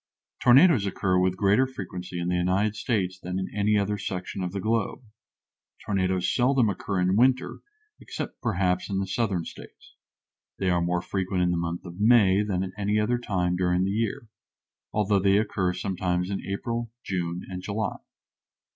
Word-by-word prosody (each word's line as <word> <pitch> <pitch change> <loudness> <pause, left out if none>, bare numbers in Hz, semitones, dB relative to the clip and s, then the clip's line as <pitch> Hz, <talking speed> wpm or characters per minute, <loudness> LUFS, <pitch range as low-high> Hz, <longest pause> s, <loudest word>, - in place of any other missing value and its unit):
Tornadoes 130 - +6
occur 95 -1 +1
with 90 0 +1
greater 105 +7 +3
frequency 90 -7 -6
in 85 - -2
the 90 - 0
United 95 +4 +1
States 95 -5 -1
than 90 0 -4
in 95 - -4
any 105 +1 +2
other 100 0 0
section 95 0 -4
of 90 - -3
the 100 - -4
globe. 110 +4 -1 0.8
Tornadoes 95 -2 0
seldom 125 -2 +3
occur 100 0 -2
in 90 +1 +2
winter, 130 +3 +2 0.4
except - - -7
perhaps 90 -5 0
in 100 - -1
the 95 - -1
Southern 95 -4 -1
States. - - -13 0.6
They 95 -2 +1
are 85 -1 +2
more 90 +1 0
frequent 95 -1 -1
in 90 - +2
the - - 0
month 85 +1 -3
of 90 +1 -9
May 105 -3 +5
than 95 -3 -1
at 95 - -5
any 105 +1 +1
other 120 +3 +1
time 90 -6 -1
during 90 0 +1
the 95 - 0
year, 110 +1 -2 0.6
although 105 -1 +2
they 100 +1 +4
occur 100 -4 0
sometimes 90 -1 -2
in 100 - -2
April, 115 +4 -3
June, 90 -2 -3
and 90 -1 -6
July. 105 +2 -3
95 Hz, 175 wpm, -26 LUFS, 90-105 Hz, 0.8 s, Tornadoes